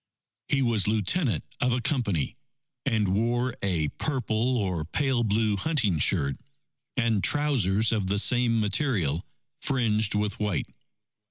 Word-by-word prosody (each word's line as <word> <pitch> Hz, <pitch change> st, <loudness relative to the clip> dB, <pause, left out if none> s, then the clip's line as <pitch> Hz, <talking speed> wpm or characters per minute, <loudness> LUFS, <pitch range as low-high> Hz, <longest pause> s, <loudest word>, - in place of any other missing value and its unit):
He 135 Hz, -1 st, +2 dB
was 115 Hz, -5 st, +1 dB
Lieutenant 110 Hz, -, +1 dB, 0.2 s
of 125 Hz, -, +1 dB
a 125 Hz, -, 0 dB
Company, 110 Hz, -, -1 dB, 0.5 s
and 105 Hz, -4 st, +1 dB
wore 120 Hz, +5 st, 0 dB
a 85 Hz, -6 st, 0 dB
purple 125 Hz, -3 st, 0 dB
or 90 Hz, -7 st, -1 dB
pale 130 Hz, -, 0 dB
blue 105 Hz, -1 st, +1 dB
hunting 110 Hz, -, 0 dB
shirt, 70 Hz, -1 st, +2 dB, 0.6 s
and 115 Hz, -5 st, +1 dB
trousers 115 Hz, -8 st, +2 dB
of 105 Hz, -4 st, 0 dB
the 100 Hz, +2 st, 0 dB
same 120 Hz, +1 st, +3 dB
material 100 Hz, -, 0 dB, 0.4 s
fringed 110 Hz, -5 st, 0 dB
with 105 Hz, -1 st, -1 dB
white. 105 Hz, -7 st, -1 dB
110 Hz, 125 wpm, -27 LUFS, 100-125 Hz, 0.6 s, same